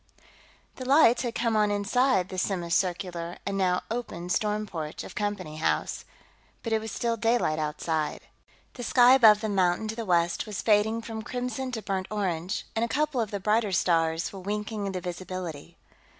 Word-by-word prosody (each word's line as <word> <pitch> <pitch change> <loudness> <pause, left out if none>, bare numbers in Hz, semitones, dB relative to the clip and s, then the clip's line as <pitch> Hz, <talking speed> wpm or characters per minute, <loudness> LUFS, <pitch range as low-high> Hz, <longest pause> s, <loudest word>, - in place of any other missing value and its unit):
The 255 - -6
lights 250 -5 +6
had 240 -2 -3
come 230 -1 0
on 210 -1 +3
inside 205 -1 +2
the 185 - -3
semicircular 175 -1 -1
and 200 - -2
now 185 -2 +1
open 225 -7 -4
storm 210 +2 0
porch 160 -6 -6
of - - -9
Company 205 -7 -3
House, 155 - -1 0.6
but 230 - -2
it 220 - +2
was 220 -1 -6
still 235 +3 -1
daylight 225 -9 +1
outside. 155 0 -2 0.5
The 250 - -8
sky 245 +1 +6
above 220 -5 +7
the 220 - -2
mountain 190 +1 +1
to 220 - -3
the 230 - -4
west 175 -2 +1
was 210 -3 -4
fading 220 +1 +2
from 220 -1 -5
crimson 250 +2 -4
to 220 -2 -4
burnt 190 -2 -2
orange, 190 -2 -2
and 225 - +1
a - - +1
couple 290 0 0
of 220 - -2
the 200 - -3
brighter 210 +1 +1
stars 165 -1 +1
were 195 - -7
winking 210 +2 -3
into 185 -2 -3
visibility. 175 -3 -6
205 Hz, 180 wpm, -27 LUFS, 180-225 Hz, 0.6 s, above